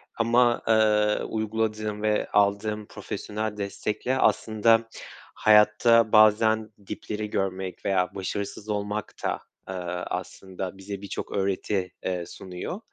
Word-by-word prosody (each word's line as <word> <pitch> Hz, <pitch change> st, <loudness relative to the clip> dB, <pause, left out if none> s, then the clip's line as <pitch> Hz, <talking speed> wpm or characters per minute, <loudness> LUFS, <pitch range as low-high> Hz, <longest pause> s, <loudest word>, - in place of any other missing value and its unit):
Ama, 120 Hz, +1 st, +3 dB
eee, 105 Hz, -1 st, +3 dB
uyguladığım 110 Hz, -1 st, -2 dB
ve 105 Hz, 0 st, +1 dB
aldığım 105 Hz, +1 st, +1 dB
profesyonel 105 Hz, 0 st, -5 dB
destekle 105 Hz, +5 st, -2 dB
aslında 115 Hz, -1 st, +3 dB, 0.5 s
hayatta 110 Hz, +1 st, +5 dB
bazen 110 Hz, 0 st, +5 dB, 0.2 s
dipleri 105 Hz, 0 st, -5 dB
görmek 95 Hz, -2 st, -3 dB
veya 90 Hz, -2 st, +1 dB
başarısız 100 Hz, +2 st, -4 dB
olmak 105 Hz, 0 st, -3 dB
da, -, -, -1 dB, 0.3 s
eee, -, -, -3 dB, 0.4 s
aslında 95 Hz, 0 st, -5 dB
bize 100 Hz, 0 st, -7 dB
birçok 100 Hz, -, -6 dB
öğreti, 95 Hz, -1 st, -1 dB
eee, 90 Hz, -2 st, -2 dB
sunuyor. 90 Hz, -, -7 dB
105 Hz, 105 wpm, -26 LUFS, 100-110 Hz, 0.5 s, hayatta